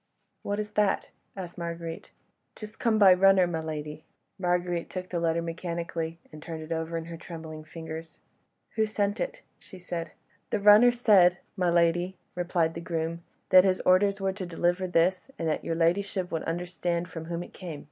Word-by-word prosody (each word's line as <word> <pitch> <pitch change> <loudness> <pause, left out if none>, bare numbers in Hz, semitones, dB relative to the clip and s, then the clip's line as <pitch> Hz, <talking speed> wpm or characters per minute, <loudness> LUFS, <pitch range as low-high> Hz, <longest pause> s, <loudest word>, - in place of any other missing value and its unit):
"What 205 +1 -2
is 210 0 -4
that?" 210 -1 +1 0.3
asked 175 -2 -7
Marguerite. 170 -1 -5 0.5
"Just 215 0 -10
come 230 -3 +2
by 195 -3 +8
runner, 190 0 +5
my 170 -2 -2
lady." 155 -1 -5 0.4
Marguerite 175 -1 0
took 185 -1 -6
the 175 - -2
letter 165 0 +1
mechanically, 170 -1 -4
and 155 - -11
turned 160 -1 -6
it 155 - -11
over 165 0 -2
in 165 - -5
her 165 0 -8
trembling 160 -2 -8
fingers. 160 0 -8 0.6
"Who 220 0 +3
sent 205 -1 -1
it?" - - -4 0.2
she 190 - -13
said. 175 -2 -5 0.4
"The 220 - 0
runner 210 +4 +8
said, 200 -7 +5 0.2
my 180 -3 +1
lady," 175 +2 +2 0.2
replied 175 -2 0
the 170 - -6
groom, 165 0 -3 0.3
"that 185 0 +8
his 190 -1 +2
orders 195 +2 +3
were 195 -1 0
to 195 0 -6
deliver 175 +2 0
this, 180 +5 +1
and 165 - -2
that 155 - -1
your 165 - -2
ladyship 180 +2 0
would 160 - -2
understand 175 0 -2
from 165 -1 -7
whom 170 +1 -4
it - - -14
came." 170 -6 -7
175 Hz, 180 wpm, -28 LUFS, 165-190 Hz, 0.6 s, by